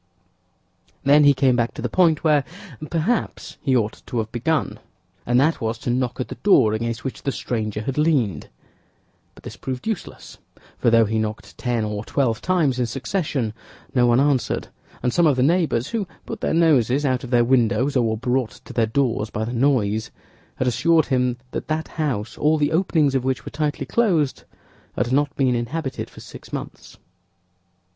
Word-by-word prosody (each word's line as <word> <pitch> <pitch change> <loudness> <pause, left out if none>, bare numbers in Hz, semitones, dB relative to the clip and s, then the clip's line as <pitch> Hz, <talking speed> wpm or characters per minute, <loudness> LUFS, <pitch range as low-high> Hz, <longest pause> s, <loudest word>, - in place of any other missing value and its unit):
Then 145 +2 +6
he 140 -1 +6
came 130 -2 +3
back 120 -1 0
to - - -6
the - - +1
point 170 -4 +2
where, 150 -3 +4 0.5
perhaps, 175 +9 -2
he 130 - +1
ought 110 -2 -2
to 125 - -4
have 110 -1 -2
begun, 150 +7 -1 0.5
and 120 +1 +3
that 155 +4 +2
was 115 0 -1
to 120 0 -3
knock 125 0 -1
at 130 - -3
the - - -8
door 115 - +5
against 115 +1 -3
which 135 - -5
the 140 - -1
stranger 110 -5 -3
had 135 +5 -2
leaned; 145 - +1 0.9
but - - -17
this - - -8
proved 130 -1 -6
useless—for 220 - -5
though 115 -1 +5
he 110 +1 -1
knocked 110 0 -4
ten 120 -3 -1
or 105 0 -4
twelve 115 -3 0
times 160 -8 +1
in 125 - +1
succession, 135 - -2 0.4
no 125 -2 +4
one 120 +1 +4
answered, 140 -2 +1 0.3
and 125 - +1
some 170 -2 +4
of 145 - +3
the 125 - +2
neighbors, 155 -5 +1
who 220 -5 -2 0.2
put - - -7
their - - 0
noses 145 -4 +3
out 130 -2 0
of 125 - -7
their 120 -1 +3
windows 130 +2 +2
or 125 - +3
were 110 - -1
brought 125 0 -1
to - - -10
their 115 -2 +2
doors 115 -3 0
by 110 0 -3
the 120 - -4
noise, 115 -5 +1 0.5
had 130 - -1
assured 155 +7 +3
him 125 -2 0
that - - -5
that 155 0 -2
house, 125 -10 -3
all 155 +1 +3
the 145 -1 +1
openings 160 -4 +2
of 135 -2 0
which 130 -1 -2
were - - -7
tightly 150 0 -2
closed, 175 - +1 0.5
had 120 - -1
not 145 +1 +1
been 130 -3 +2
inhabited 130 +4 -3
for - - -13
six - - -12
months. - - -7
130 Hz, 185 wpm, -22 LUFS, 115-150 Hz, 0.9 s, Then